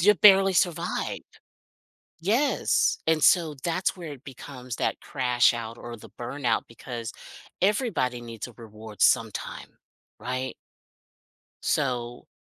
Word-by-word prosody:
you 210 +4 +6
barely 195 -1 +7
survive, 175 -2 0 1.0
yes, 230 - +2
and 160 -1 +2
so 165 -4 +5
that's 175 +3 0
where 170 -5 -7
it 135 - -11
becomes 130 -2 -8
that - - -1
crash 125 -1 +3
out, 115 0 -5
or 120 0 -7
the 110 - -14
burnout 120 -2 -1
because 115 0 -6 0.5
everybody 190 - +1
needs 115 -3 -7
a 125 - -13
reward 110 -2 -11
sometime, - - +1 0.4
right? 130 +1 -3 1.1
So, 120 -4 -1
130 Hz, 115 wpm, -26 LUFS, 120-175 Hz, 1.1 s, barely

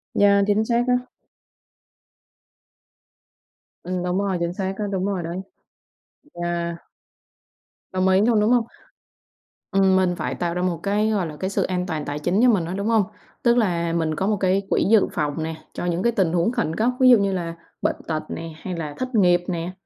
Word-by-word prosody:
Yeah, 200 0 +5
chính 210 +2 +2
xác 235 +1 +2
á. 250 0 +1 2.8
Ừm, 180 0 -3
đúng 180 +1 -1
rồi, 195 -3 0
chính 170 0 -1
xác 190 0 -2
á, 210 - -2
đúng 190 0 -1
rồi 190 -4 -2
đấy. 170 +2 -4 1.0
Yeah. 170 0 -2 1.2
Đồng 185 0 +1
ý 190 +1 +4
luôn, 225 0 +3
đúng 210 +3 +3
hông? 240 -2 +3 1.1
Ừm, 190 -1 +4
mình 185 -2 +2
phải - - -3
tạo 170 -1 -2
ra 180 - -2
một 175 -3 -1
cái, 210 +2 +1
gọi 195 -6 0
là, 150 -1 -8
cái 190 - -2
sự - - 0
an 180 -1 -1
toàn 155 -5 -3
tài 145 +1 -4
chính 175 +6 0
cho 250 - +6
mình 185 -7 +2
á, 175 - -4
đúng 200 +2 -2
hông? 225 -2 +4 0.4
Tức 240 0 +4
là 170 -6 +1
mình 160 -2 0
có 190 +5 -1
một 210 -1 +1
cái 190 +1 +2
quỹ - - +2
dự 215 0 +4
phòng 150 +1 -2
nè, 160 0 -4 0.2
cho - - -4
những 175 +1 -1
cái 235 - +3
tình 190 -7 +1
huống 175 +6 +2
khẩn 160 -9 -1
cấp. 225 +3 +2
Ví 255 - +7
dụ 245 - +8
như 200 -1 0
là 170 -2 -3 0.3
bệnh - - +1
tật 155 -1 -2
nè 165 -1 -6
hay 185 -2 -4
là 150 -3 -4
thất 255 -1 -4
nghiệp 175 -3 +4
nè, 170 -1 -3
185 Hz, 205 wpm, -23 LUFS, 170-205 Hz, 2.8 s, dụ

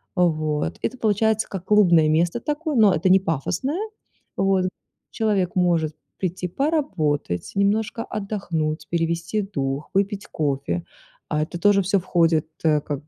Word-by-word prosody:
Вот, 155 - 0
это 260 - -2
получается 220 0 +1
как 185 -2 -6
клубное 175 -7 +5
место 170 +7 +2
такое, 300 +3 -2
но 215 -5 +6
это 180 +3 +1
не 190 - +7
пафосное. 190 - -2 0.6
Вот, 195 -1 +2 0.4
человек 205 -3 0
может 170 -4 +1 0.2
прийти 180 -1 -2
поработать, 175 - -1
немножко 215 +3 +1
отдохнуть, 175 -7 -3
перевести 170 +5 -1
дух, 140 -7 -3
выпить 200 +1 0
кофе. 135 - -2 0.5
А 150 0 +1
это 170 +2 -6
тоже 205 0 +4
всё 195 +1 +1
входит, 165 -3 +2 0.2
э, 155 -2 +3
как 145 0 -5
180 Hz, 135 wpm, -23 LUFS, 155-205 Hz, 0.6 s, не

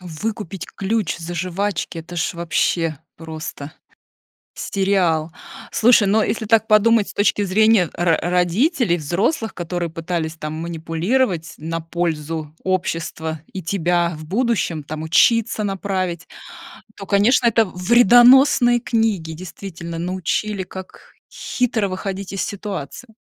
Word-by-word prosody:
Выкупить 190 +1 -5
ключ 200 -2 -1
за 170 +1 -6
жвачки- 185 0 -2
это 170 +2 -9
ж 170 - -1
вообще 165 -2 0 0.2
просто 155 -2 -7 0.8
сериал. 180 -5 0 0.4
Слушай, 225 -3 +4
ну 220 +2 +3
если 220 - -2
так 220 0 +3
подумать 215 0 +4
с - - -10
точки 205 0 +2
зрения 205 -1 +3
ро 170 -1 +2
родителей, 180 - +1
взрослых, 200 - -1
которые 175 0 -3
пытались, 165 0 -3
там, 155 -1 -5
манипулировать 165 +4 -1
на 165 +2 -4
пользу 160 -2 -3
общества, 165 -4 -2
и 190 - -5
тебя 175 -1 0
в 155 - -9
будущем, 205 - 0
там, 155 +2 -6
учиться 225 +6 +3
направить, 185 -3 -3 0.7
то, 195 - -8
конечно, 215 +6 +3
это 230 0 +4
вредоносные 240 +5 +5
книги, 215 -8 0
действительно, 170 0 -8
научили, 185 +3 -2
как 190 0 -11 0.2
хитро 230 -5 -1
выходить 195 +1 -5
из 195 - -2
ситуации. 205 - -6
185 Hz, 120 wpm, -20 LUFS, 165-215 Hz, 0.8 s, вредоносные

